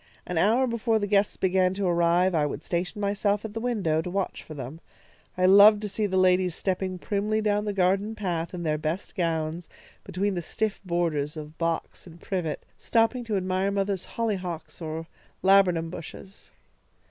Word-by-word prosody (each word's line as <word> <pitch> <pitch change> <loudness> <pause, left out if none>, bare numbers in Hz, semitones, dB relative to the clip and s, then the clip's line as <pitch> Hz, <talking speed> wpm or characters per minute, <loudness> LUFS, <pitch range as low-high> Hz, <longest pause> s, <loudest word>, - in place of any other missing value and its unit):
An 180 -2 -1
hour 230 +8 +4
before 230 -2 0
the 205 - -1
guests 205 0 +2
began 185 0 +2
to 200 0 -2
arrive 175 +1 +3
I 150 -3 +2
would - - -6
station 180 +4 -2
myself 205 +1 0
at 215 - -6
the 225 - -3
window, 205 -10 0
to 180 - -5
watch 195 +1 -2
for 155 - -10
them. 140 +4 -7 0.6
I 185 - +3
loved 205 +3 +8
to - - -1
see 210 +1 -1
the 190 -1 -1
ladies 185 -1 +3
stepping 185 -1 -2
primly 210 +3 -1
down 210 -1 +1
the 210 - -1
garden 195 +3 +1
path 175 -5 -2
in 175 -2 -5
their 155 -2 0
best 160 +5 -3
gowns, 165 -2 -2 0.3
between 200 +3 -1
the 175 - -2
stiff 215 +5 -2
borders 165 -4 -1
of 155 0 -8
box 165 +1 -3
and 170 0 -13
privet, 175 -6 -3
stopping 230 +2 +1
to 215 -3 -1
admire 185 +1 0
mother's 195 -1 -1
hollyhocks 185 -8 -3
or 160 0 -4 0.4
laburnum 180 -4 +4
bushes. 190 +3 -10
185 Hz, 180 wpm, -26 LUFS, 170-205 Hz, 0.6 s, loved